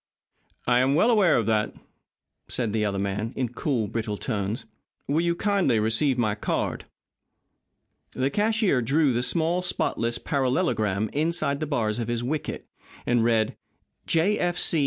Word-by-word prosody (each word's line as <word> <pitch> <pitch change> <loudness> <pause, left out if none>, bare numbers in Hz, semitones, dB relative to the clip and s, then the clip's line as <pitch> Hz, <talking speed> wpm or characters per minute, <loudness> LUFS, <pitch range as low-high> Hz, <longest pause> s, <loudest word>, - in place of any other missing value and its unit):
"I 120 0 +3
am 135 +2 +3
well 230 +10 +4
aware 200 -8 +4
of 115 - +1
that," 110 -1 0 0.7
said 115 -5 -2
the 110 -1 +1
other 100 -2 -1
man, 100 +3 -2
in 130 -3 -1
cool, 120 -2 -1
brittle 110 0 -3
tones. 105 0 -3 0.4
"Will 150 +4 +1
you 170 0 +1
kindly 190 - +2
receive 115 +5 +2
my 110 -4 +1
card?" 105 - -2 1.3
The 130 +2 0
cashier 210 - +2
drew 140 +3 +2
the 120 - 0
small, 170 +6 +1
spotless 120 -9 -1
parallelogram 110 -7 0
inside 155 -2 0
the 155 - -3
bars 115 -6 -1
of 115 - -2
his 120 0 -2
wicket, 150 +5 -3 0.4
and 120 -2 +2
read: 115 -2 +2 0.5
J. 175 +6 +2
F. 175 0 0
C. 165 - +2
125 Hz, 155 wpm, -25 LUFS, 110-160 Hz, 1.3 s, well